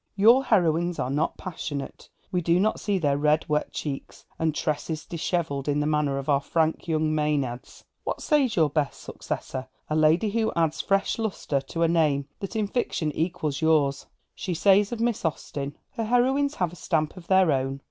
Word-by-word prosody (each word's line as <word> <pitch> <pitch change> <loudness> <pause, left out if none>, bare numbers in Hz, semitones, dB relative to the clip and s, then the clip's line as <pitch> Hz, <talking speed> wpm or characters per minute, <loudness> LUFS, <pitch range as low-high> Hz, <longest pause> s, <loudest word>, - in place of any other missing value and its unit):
Your 230 +7 +6
heroines 175 -5 +2
are 125 - -2
not 150 +3 0
passionate, 150 -5 -6 0.2
we 180 -2 +1
do 170 +1 +3
not 215 +3 +1
see 205 -2 0
their 145 -5 +1
red 150 +1 +2
wet 150 0 0
cheeks, 140 -3 -6
and 160 -2 0
tresses 155 0 -2
dishevelled 160 -4 -2
in 145 0 +1
the 150 - 0
manner 150 -2 +1
of 140 - -5
our 140 -2 +3
frank 160 +3 0
young 155 -1 +1
Maenads. 145 -5 -2 0.2
What - - -3
says 280 -7 +2
your 155 -4 +3
best 145 -2 -1
successor, 130 0 -5 0.2
a - - +2
lady 160 +7 +3
who 225 0 +1
adds 165 -2 +1
fresh 195 +3 +1
lustre 190 -10 -1
to 165 - -1
a - - +4
name 150 -4 +2
that 195 +2 -6
in 215 -1 +1
fiction 200 -8 -1
equals 155 -3 -2
yours? 150 -4 +2 0.3
She 180 -3 -4
says 200 +4 +4
of 240 - -4
Miss 235 -1 0
Austen: 145 -3 -3
'Her 230 -4 -3
heroines 265 +5 +2
have 175 -2 -1
a - - -9
stamp 155 -2 -1
of 180 -2 -12
their 190 -3 +4
own. 135 0 -1
160 Hz, 190 wpm, -26 LUFS, 150-195 Hz, 0.3 s, Your